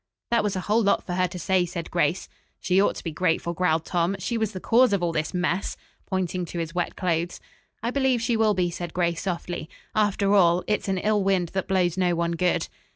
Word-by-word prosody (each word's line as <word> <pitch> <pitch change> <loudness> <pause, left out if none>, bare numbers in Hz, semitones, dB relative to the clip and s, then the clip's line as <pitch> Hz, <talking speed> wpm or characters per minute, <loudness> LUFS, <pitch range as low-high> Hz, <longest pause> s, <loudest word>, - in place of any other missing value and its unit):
"That 235 -2 +3
was 205 -1 -1
a 185 - -2
whole 215 +5 +2
lot 200 -2 +2
for 180 - -4
her 185 0 +2
to 180 +1 -8
say," 185 +1 +2
said 170 -1 -5
Grace. 170 0 0 0.3
"She 185 +1 +2
ought - - +2
to - - -8
be 165 - -3
grateful," 170 +1 0
growled 165 -2 +1
Tom. 175 +2 0
"She 195 +5 -3
was 220 -2 0
the 185 - -6
cause 240 +3 +4
of 195 -3 +1
all 170 - +1
this 155 -1 -2
mess," 180 +1 -1 0.3
pointing 185 -1 -1
to 170 - -7
his 165 -1 -3
wet 175 -1 -2
clothes. 175 -1 -1 0.4
"I 235 - 0
believe 265 -2 +2
she 230 +1 0
will 220 -2 +3
be," 180 -1 +1
said 175 -1 -6
Grace 170 -1 0
softly, 175 -3 -4 0.2
"After 205 -1 +2
all, 180 -3 +4
'It's 210 -1 -1
an 190 -1 0
ill 210 +1 +1
wind 190 -3 +1
that 190 +1 -3
blows 185 -2 +1
no 180 -2 +2
one 170 0 0
good.'" 175 +1 +1
180 Hz, 230 wpm, -25 LUFS, 170-200 Hz, 0.4 s, cause